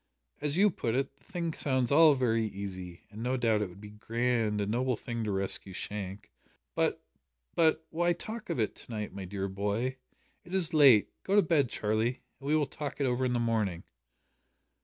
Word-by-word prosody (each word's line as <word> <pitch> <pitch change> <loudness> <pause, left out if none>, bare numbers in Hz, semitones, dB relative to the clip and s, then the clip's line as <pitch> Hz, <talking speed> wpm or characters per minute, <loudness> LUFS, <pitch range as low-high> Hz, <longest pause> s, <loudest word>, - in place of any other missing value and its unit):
"As 150 +2 0
you 205 +1 +5
put 115 -7 -2
it, 135 +1 -1
the - - -30
thing 170 -3 -3
sounds 130 -4 0
all 155 0 +7
very 115 -4 +1
easy, 95 -4 -6
and 110 +1 -8
no 125 +2 0
doubt 115 -3 +2
it 105 - -1
would 90 - -14
be 105 - -9
a - - -13
grand, 115 0 0
a 100 - 0
noble 125 +3 0
thing 115 0 -4
to 105 - -1
rescue 95 0 -2
Shank 100 +1 -6 0.4
but - - 0 0.5
but, 160 -1 +3
why 175 +2 +2
talk 215 +6 -7
of - - -1
it 110 - +1
to - - -12
night, 105 -2 -4
my 95 -1 -6
dear 95 +1 -3
boy? 105 +7 -2 0.5
It 180 - -6
is 170 -3 0
late. 135 -9 +6
Go 195 - 0
to 205 - +6
bed, 150 -6 +2
Charlie, 110 +4 -1 0.2
and 140 - -8
we 150 - +3
will 155 -2 +3
talk 145 0 -6
it 140 - +2
over 125 0 +1
in 125 - +1
the 120 - +1
morning." 110 -7 0
120 Hz, 205 wpm, -30 LUFS, 105-145 Hz, 0.5 s, all